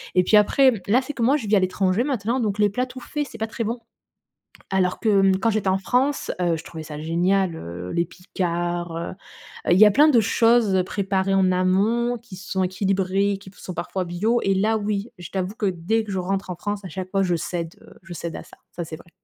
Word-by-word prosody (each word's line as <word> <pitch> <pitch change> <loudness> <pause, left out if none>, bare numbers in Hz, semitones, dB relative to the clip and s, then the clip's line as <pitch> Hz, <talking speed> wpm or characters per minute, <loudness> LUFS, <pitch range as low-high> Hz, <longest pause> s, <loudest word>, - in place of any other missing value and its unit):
et 180 - +5
puis 210 +4 +5
après, 260 +6 +5 0.2
là, 235 +6 +4
c'est 270 +3 -6
que, 240 - -2
moi, 265 +5 +4
je 235 -7 -6
vis 210 - +3
à - - +5
l'étranger 185 +3 +1
maintenant, 250 -3 -1
donc 210 -3 -1
les 210 0 +4
plats 250 +6 -1
tout 255 0 -10
faits, 295 +3 -4
c'est - - -9
pas 220 - -1
très 230 - -4
bon. 230 +3 -3 0.9
Alors 185 -1 +1
que, 225 - +1
mmh, 190 -1 +4
quand 230 - +2
j'étais 210 -2 -1
en 190 - +2
France, 260 +8 0
heu, 170 -2 +1
je 160 - -9
trouvais 160 -2 -8
ça 150 -1 -8
génial, 175 +3 +1
heu, 90 - -7
les 170 - +1
Picard, 175 -1 -3
heu 170 - -4 0.6
heu, - - +6
il 180 - +4
y 215 - +10
a - - +7
plein 295 +8 +6
de 250 -6 +5
choses 225 -3 +3
préparées 195 -1 -1
en 190 -1 +3
amont 205 +7 +1
qui 235 -5 -12
sont 190 0 -2
équilibrées, 195 +1 0
qui 195 - -13
p - - -24
sont 185 - -7
parfois 185 +1 -3
bio, 210 +8 0
et 195 - +2
là, 215 +3 +2
oui, 210 +1 -2
je 175 - -9
t'avoue 190 +2 -3
que 215 - -2
dès 190 +5 0
que 210 - -7
je 190 - -1
rentre 190 +1 -2
en - - -4
France, 205 +2 -4
à - - -6
chaque 185 0 -6
fois, 195 -1 +2
je 180 -2 +1
cède, 170 0 -4
heu, - - -16
je 190 -2 -9
cède 170 -1 -5
à - - -7
ça, - - -17 0.2
ça, 175 - -3
c'est 160 - -7
vrai. 170 - -18
195 Hz, 250 wpm, -23 LUFS, 180-220 Hz, 0.9 s, y